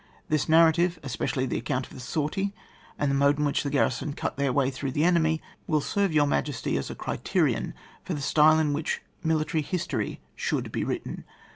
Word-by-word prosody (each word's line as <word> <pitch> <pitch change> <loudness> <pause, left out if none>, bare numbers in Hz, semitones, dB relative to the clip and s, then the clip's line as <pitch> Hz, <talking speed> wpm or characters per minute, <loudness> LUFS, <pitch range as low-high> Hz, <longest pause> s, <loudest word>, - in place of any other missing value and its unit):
This 155 -1 +1
narrative, 165 +2 +5
especially 130 +1 -1
the 120 - -2
accoimt 130 +1 -1
of - - -11
the - - -9
sortie, 155 - -2 0.4
and 145 -1 +1
the - - +1
mode 140 +1 +3
in 150 - +1
which 145 - +1
the 145 - -2
garrison 140 0 0
cut - - -3
their 140 -1 +1
way 135 0 +2
through 130 0 -4
liie 150 - +1
enemy, 160 -3 +2 0.2
will 155 -2 +2
serve 200 +5 0
Your 150 -2 +4
Boyal 145 - +2
Highness 145 -4 -6
as 70 0 -1
a - - -6
criterion - - -1 0.3
for 175 - -3
the 145 - -4
style 155 +2 +5
in 155 -2 +2
which 150 +2 -2 0.2
military 160 0 +1
history 170 +4 -2 0.2
should - - -2
be - - -1
written. - - -4
150 Hz, 205 wpm, -27 LUFS, 140-160 Hz, 0.4 s, narrative